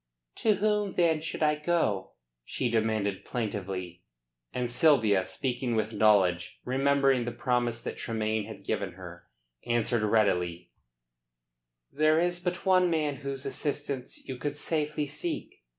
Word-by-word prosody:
"To 215 -2 +3
whom 210 0 0
then 165 -3 +3
should 160 - -3
I 150 0 +4
go?" 150 - 0 0.3
she 120 - -2
demanded 110 -3 0
plaintively. 95 -6 -4 0.5
And 125 -1 -1
Sylvia, 120 - +4
speaking 125 +2 -2
with 110 0 -1
knowledge, 100 -5 +3
remembering 135 0 +3
the 120 - -2
promise 120 -2 -1
that - - -5
Tremayne 110 -2 -1
had 105 -3 -10
given 95 -3 -2
her, 90 -1 -11 0.4
answered 120 -1 +1
readily: 90 -5 +1 1.2
"There 155 +2 +3
is 175 +1 +1
but 180 +1 -3
one 185 -1 +4
man 150 -4 0
whose 140 -1 -5
assistance 140 -3 -3
you 130 - -5
could 145 +2 -3
safely 150 -1 -1
seek. 305 - -5
125 Hz, 135 wpm, -29 LUFS, 105-150 Hz, 1.2 s, I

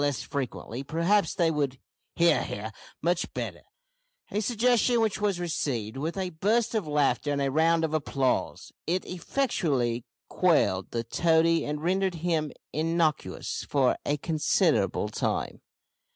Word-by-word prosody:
less 145 -2 0
frequently, 130 -2 -4
perhaps 170 +8 +1
they 170 -2 +2
would 140 -4 -1 0.4
"he 170 0 +5
ar" 110 -5 -3 0.3
much 170 +1 0
better - - -4 0.7
a 210 - 0
suggestion 240 +1 +2
which 215 -2 0
was 200 -4 +1
received 135 -10 -2
with 160 +7 -3
a 185 -2 -2
burst 215 +8 +1
of 215 -8 -1
laughter 145 -2 +1
and 140 - 0
a 135 -1 0
round 165 +2 +3
of 155 - -4
applause. 140 -4 -1 0.2
It 180 +3 0
effectually 145 - -1 0.2
quelled - - +2
the 115 -1 -2
toady 165 +6 +3
and 150 +1 -4
rendered 190 +1 +1
him 160 -3 -1 0.2
innocuous 160 -1 -1
for 135 -3 +3
a 145 - 0
considerable 155 +1 +1
time. - - -2
160 Hz, 135 wpm, -27 LUFS, 140-180 Hz, 0.7 s, he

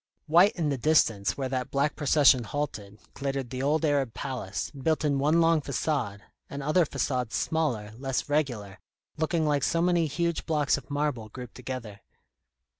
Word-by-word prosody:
White 175 +7 +5
in 160 -4 -1
the 140 -3 -2
distance 115 -9 +2
where 135 -2 -2
that 130 0 -2
black 140 +2 0
procession 145 -3 +4
halted, 105 -6 -5
glittered 135 -3 -3
the 130 0 -3
old 155 +4 +1
Arab 140 -6 0
palace, 125 -8 -4
built 155 +3 -1
in 140 -2 +1
one 150 +4 +3
long 165 -1 +4
façade, 130 -6 -2 0.3
and 140 0 -6
other 155 +3 +3
façades 125 -5 -2
smaller, 120 -10 -1
less 135 -1 -2
regular, 125 -10 -1 0.4
looking 160 +1 0
like 145 -2 +1
so 165 - +1
many 170 -1 +2
huge 170 +3 -2
blocks 150 -3 +2
of 140 - -9
marble 145 -6 -2
grouped 125 +1 -9
together. 120 -5 -7
140 Hz, 165 wpm, -27 LUFS, 125-155 Hz, 0.4 s, White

